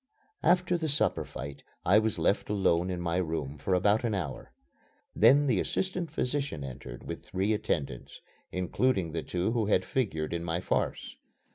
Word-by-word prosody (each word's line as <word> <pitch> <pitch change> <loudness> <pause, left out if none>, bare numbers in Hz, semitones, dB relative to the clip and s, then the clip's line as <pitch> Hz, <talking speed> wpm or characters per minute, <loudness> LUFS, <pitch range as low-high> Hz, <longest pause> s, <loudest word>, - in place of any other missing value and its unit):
After 180 0 +3
the 160 -1 -1
supper 145 - +1
fight 70 0 -8 0.2
I 100 +4 +6
was 110 -1 0
left 100 - +1
alone 95 -3 +2
in 90 -1 -2
my 85 0 -1
room 80 -5 -2
for 90 +7 +1
about 105 +5 +3
an 115 -3 0
hour. 75 -9 -4 0.6
Then 135 +6 +6
the 120 -9 +2
assistant 185 -3 -1
physician 140 - -2
entered 65 -3 -8
with - - -6
three 95 +3 0
attendants, 70 - -3 0.3
including 90 0 0
the 80 0 -2
two 90 +6 -1
who 115 -3 0
had 95 -3 +3
figured 85 -12 -1
in 85 0 -2
my 85 0 -1
farce. - - -2
95 Hz, 165 wpm, -29 LUFS, 85-120 Hz, 0.6 s, I